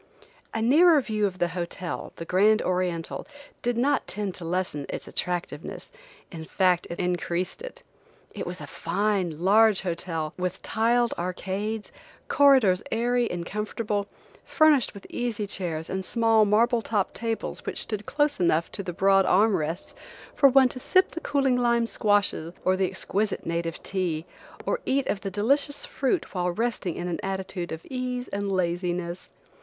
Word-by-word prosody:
A 225 Hz, -, -2 dB
nearer 310 Hz, +6 st, +6 dB
view 215 Hz, -5 st, 0 dB
of 185 Hz, -2 st, -7 dB
the 175 Hz, -1 st, +1 dB
hotel, 175 Hz, +1 st, -5 dB
the 165 Hz, -, -7 dB
Grand 210 Hz, +6 st, +4 dB
Oriental, 180 Hz, -2 st, -2 dB, 0.3 s
did 245 Hz, -1 st, -1 dB
not 270 Hz, +4 st, +1 dB
tend 205 Hz, -2 st, -3 dB
to 175 Hz, -, -6 dB
lessen 165 Hz, -4 st, -2 dB
its -, -, -5 dB
attractiveness–in 180 Hz, -, -6 dB
fact 180 Hz, 0 st, +2 dB
it 170 Hz, -, -5 dB
increased 180 Hz, -, -2 dB
it. -, -, -9 dB, 0.5 s
It -, -, -6 dB
was -, -, -5 dB
a -, -, -7 dB
fine, 190 Hz, -6 st, -1 dB
large 215 Hz, +1 st, +5 dB
hotel, 165 Hz, -3 st, -2 dB
with 180 Hz, +1 st, -2 dB
tiled 235 Hz, +2 st, +2 dB
arcades, 195 Hz, +4 st, -3 dB, 0.4 s
corridors 260 Hz, -10 st, +5 dB
airy 240 Hz, +1 st, +1 dB
and 175 Hz, -1 st, -4 dB
comfortable, 210 Hz, 0 st, -2 dB, 0.4 s
furnished 305 Hz, -8 st, +3 dB
with 200 Hz, -, -11 dB
easy 230 Hz, -4 st, -2 dB
chairs 170 Hz, -5 st, -3 dB
and 190 Hz, 0 st, -3 dB
small 225 Hz, +1 st, +3 dB
marble 230 Hz, +3 st, +3 dB
topped 210 Hz, -4 st, -1 dB
tables 230 Hz, -1 st, -3 dB
which -, -, -1 dB
stood 210 Hz, -2 st, -3 dB
close 295 Hz, 0 st, +1 dB
enough 170 Hz, -2 st, +2 dB
to -, -, -4 dB
the 180 Hz, -2 st, -5 dB
broad 195 Hz, +1 st, +4 dB
arm 210 Hz, +2 st, +4 dB
rests, 165 Hz, +2 st, -3 dB, 0.4 s
for 280 Hz, -2 st, +6 dB
one 265 Hz, -1 st, +6 dB
to 255 Hz, -, -5 dB
sip 370 Hz, +8 st, +3 dB
the 335 Hz, -, -6 dB
cooling 270 Hz, -3 st, +1 dB
lime 235 Hz, -1 st, +2 dB
squashes 205 Hz, -7 st, 0 dB
or 185 Hz, -, +4 dB
the 190 Hz, 0 st, +1 dB
exquisite 200 Hz, +2 st, -2 dB
native 170 Hz, 0 st, -3 dB
tea, 175 Hz, -4 st, -2 dB, 0.4 s
or -, -, 0 dB
eat 270 Hz, 0 st, +1 dB
of 205 Hz, -, -2 dB
the 195 Hz, -, -3 dB
delicious 280 Hz, +9 st, +1 dB
fruit 275 Hz, +7 st, -1 dB
while 180 Hz, -2 st, 0 dB
resting 210 Hz, -3 st, -2 dB
in 175 Hz, -, -4 dB
an 175 Hz, -, -3 dB
attitude 190 Hz, -2 st, -4 dB
of 160 Hz, 0 st, -6 dB
ease 250 Hz, -1 st, -3 dB
and 200 Hz, 0 st, -2 dB
laziness. 175 Hz, -1 st, -2 dB
200 Hz, 160 wpm, -26 LUFS, 180-235 Hz, 0.5 s, nearer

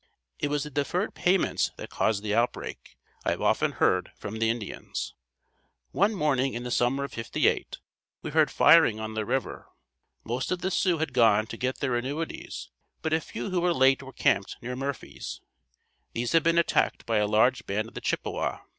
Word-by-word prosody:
It -, -, 0 dB
was 145 Hz, 0 st, -1 dB
the 150 Hz, -, -7 dB
deferred 165 Hz, +8 st, -1 dB
payments 185 Hz, +1 st, +2 dB
that -, -, -8 dB
caused 105 Hz, -2 st, 0 dB
the 105 Hz, -1 st, -1 dB
outbreak, 120 Hz, +2 st, -2 dB, 0.3 s
I -, -, 0 dB
have -, -, -1 dB
often -, -, +2 dB
heard -, -, +1 dB
from 110 Hz, +2 st, -6 dB
the 115 Hz, 0 st, +2 dB
Indians. 115 Hz, -3 st, -4 dB, 0.8 s
One 205 Hz, +3 st, +2 dB
morning 135 Hz, -6 st, +1 dB
in 120 Hz, -, -4 dB
the 125 Hz, -, -5 dB
summer 125 Hz, +4 st, +1 dB
of 140 Hz, -, -5 dB
'58 115 Hz, -1 st, 0 dB, 0.5 s
we -, -, -4 dB
heard -, -, +4 dB
firing 150 Hz, -10 st, +6 dB
on 110 Hz, 0 st, -5 dB
the 110 Hz, -1 st, -3 dB
river. 135 Hz, -1 st, -2 dB, 0.6 s
Most 125 Hz, +8 st, -3 dB
of 180 Hz, -1 st, -1 dB
the 190 Hz, -, -1 dB
Sioux 180 Hz, -2 st, +2 dB
had 160 Hz, -4 st, -2 dB
gone 110 Hz, -4 st, +4 dB
to 110 Hz, -, -7 dB
get 130 Hz, +3 st, -3 dB
their 130 Hz, -3 st, 0 dB
annuities 140 Hz, +7 st, -4 dB, 0.3 s
but 160 Hz, -, 0 dB
a 160 Hz, -, +2 dB
few 200 Hz, -, -6 dB
who 180 Hz, -1 st, +1 dB
were 175 Hz, -1 st, +2 dB
late 130 Hz, +1 st, +4 dB
were 135 Hz, 0 st, -10 dB
camped 130 Hz, -8 st, +1 dB
near 125 Hz, +1 st, -5 dB
Murphy's. 135 Hz, +1 st, -5 dB, 0.7 s
These 120 Hz, 0 st, -2 dB
had 165 Hz, -, +5 dB
been 165 Hz, +2 st, +2 dB
attacked 170 Hz, -, +2 dB
by 115 Hz, -1 st, +1 dB
a 105 Hz, -, +2 dB
large 115 Hz, +4 st, +2 dB
band 110 Hz, +3 st, -1 dB
of -, -, -23 dB
the -, -, -6 dB
Chippewa. -, -, -2 dB
130 Hz, 190 wpm, -27 LUFS, 115-160 Hz, 0.8 s, firing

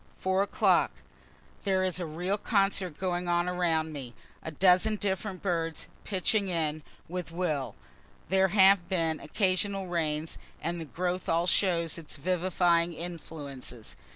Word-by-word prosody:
4. 190 Hz, +1 st, +1 dB
o'clock: 200 Hz, -2 st, +3 dB, 0.7 s
There 190 Hz, -1 st, +2 dB
is 185 Hz, -1 st, 0 dB
a 175 Hz, -, -3 dB
real 180 Hz, +6 st, -1 dB
concert 195 Hz, -7 st, +1 dB
going 180 Hz, -1 st, -1 dB
on 175 Hz, 0 st, +2 dB
around 165 Hz, -3 st, 0 dB
me 130 Hz, -5 st, -7 dB, 0.3 s
a -, -, -5 dB
dozen 185 Hz, +6 st, +4 dB
different 195 Hz, -1 st, -3 dB
birds 165 Hz, -4 st, -1 dB, 0.2 s
pitching 200 Hz, +1 st, +1 dB
in 155 Hz, -3 st, -1 dB, 0.3 s
with 180 Hz, 0 st, -5 dB
a -, -, -12 dB
will. 150 Hz, -, -1 dB, 0.5 s
There 190 Hz, +1 st, +4 dB
have 190 Hz, -2 st, +5 dB
been 165 Hz, -4 st, 0 dB
occasional 195 Hz, +2 st, 0 dB
rains, 160 Hz, -3 st, -2 dB, 0.2 s
and 170 Hz, 0 st, -3 dB
the -, -, -5 dB
growths 180 Hz, +3 st, -3 dB
all 165 Hz, +1 st, +2 dB
show 180 Hz, -2 st, +3 dB
its 165 Hz, -2 st, -4 dB
vivifying 175 Hz, +1 st, +2 dB
influences. 145 Hz, -8 st, -8 dB
175 Hz, 140 wpm, -29 LUFS, 165-190 Hz, 0.7 s, have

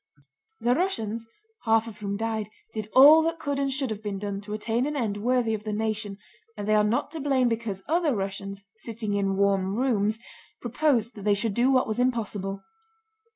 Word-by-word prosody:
The 240 Hz, -, +2 dB
Russians, 230 Hz, -, -2 dB, 0.4 s
half 225 Hz, 0 st, +3 dB
of 215 Hz, -2 st, -10 dB
whom 200 Hz, -1 st, -3 dB
died, 220 Hz, -1 st, -2 dB, 0.2 s
did 215 Hz, -1 st, -5 dB
all 295 Hz, +5 st, +9 dB
that 330 Hz, +1 st, -1 dB
could 285 Hz, -3 st, -2 dB
and 275 Hz, -1 st, 0 dB
should 265 Hz, -2 st, -1 dB
have 215 Hz, -1 st, -5 dB
been 205 Hz, -2 st, -4 dB
done 200 Hz, 0 st, -4 dB
to 210 Hz, 0 st, -7 dB
attain 225 Hz, +4 st, -1 dB
an 300 Hz, -, -3 dB
end 220 Hz, -7 st, -1 dB
worthy 240 Hz, +1 st, +1 dB
of 210 Hz, -1 st, -3 dB
the 215 Hz, -, -3 dB
nation, 215 Hz, -2 st, -2 dB, 0.4 s
and 205 Hz, 0 st, -5 dB
they 215 Hz, -, +3 dB
are 210 Hz, 0 st, +5 dB
not 225 Hz, +7 st, 0 dB
to 325 Hz, -, -5 dB
blame 270 Hz, -3 st, +2 dB
because 225 Hz, -5 st, -3 dB
other 320 Hz, -4 st, +2 dB
Russians, 195 Hz, 0 st, -5 dB
sitting 220 Hz, -2 st, -4 dB
in 195 Hz, -1 st, 0 dB
warm 195 Hz, -1 st, +2 dB
rooms, 220 Hz, -4 st, +1 dB, 0.4 s
proposed 245 Hz, -2 st, +1 dB
that 210 Hz, -, -10 dB
they 205 Hz, 0 st, +3 dB
should 210 Hz, +1 st, -1 dB
do 240 Hz, +5 st, +3 dB
what 255 Hz, -1 st, +3 dB
was 220 Hz, +2 st, -2 dB
impossible. 210 Hz, -6 st, -1 dB
220 Hz, 200 wpm, -26 LUFS, 205-250 Hz, 0.4 s, all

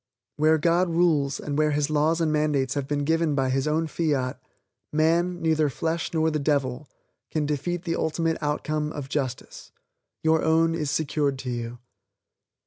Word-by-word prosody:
Where 155 Hz, +1 st, +4 dB
God 170 Hz, +3 st, +2 dB
rules, 160 Hz, -5 st, +2 dB
and 145 Hz, 0 st, -3 dB
where 155 Hz, 0 st, +3 dB
His 150 Hz, 0 st, 0 dB
laws 155 Hz, +2 st, +2 dB
and 155 Hz, -2 st, +1 dB
mandates 145 Hz, -3 st, +1 dB
have 140 Hz, -2 st, -3 dB
been 145 Hz, 0 st, -1 dB
given 160 Hz, 0 st, +1 dB
by 135 Hz, -2 st, +1 dB
His 135 Hz, +2 st, 0 dB
own 160 Hz, +2 st, +1 dB
fiat, 145 Hz, -5 st, -1 dB, 0.5 s
"man, 170 Hz, +3 st, +2 dB
neither 155 Hz, -2 st, +2 dB
flesh 160 Hz, +5 st, -2 dB
nor 160 Hz, -1 st, +1 dB
the 155 Hz, -, -1 dB
devil" 140 Hz, -2 st, -1 dB, 0.4 s
can 155 Hz, -2 st, -1 dB
defeat 165 Hz, +4 st, -2 dB
the 165 Hz, -2 st, -1 dB
ultimate 160 Hz, +1 st, -1 dB
outcome 150 Hz, 0 st, -1 dB
of 140 Hz, -2 st, -6 dB
justice. 130 Hz, -4 st, -4 dB, 0.5 s
Your 160 Hz, 0 st, +3 dB
own 165 Hz, +1 st, +3 dB
is 155 Hz, -3 st, -2 dB
secured 145 Hz, -2 st, 0 dB
to 125 Hz, -, -2 dB
you. 120 Hz, 0 st, -4 dB
150 Hz, 165 wpm, -25 LUFS, 140-160 Hz, 0.5 s, Where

